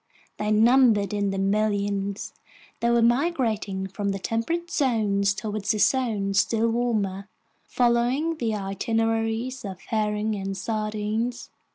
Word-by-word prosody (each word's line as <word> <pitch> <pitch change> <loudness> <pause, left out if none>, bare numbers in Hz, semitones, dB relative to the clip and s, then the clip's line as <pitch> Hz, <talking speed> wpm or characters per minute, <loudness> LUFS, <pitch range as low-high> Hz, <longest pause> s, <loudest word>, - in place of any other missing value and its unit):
They 210 - -2
numbered 220 -2 +4
in 205 -1 0
the 195 - -2
millions. 200 0 -1 0.5
They 235 - +1
were 235 -1 +3
migrating 235 - +1
from 200 +1 -3
the 195 - -1
temperate 230 - -2
zones 205 -7 +1
toward 210 -1 -4
zones 210 -3 +2
still 225 +2 +2
warmer, 215 -5 -1 0.4
following 250 +7 +1
the 225 -6 -1
itineraries 225 +5 -1
of 190 -3 -6
herring 215 0 -1
and 195 -1 -4
sardines. 215 +3 -3
215 Hz, 120 wpm, -25 LUFS, 200-235 Hz, 0.5 s, numbered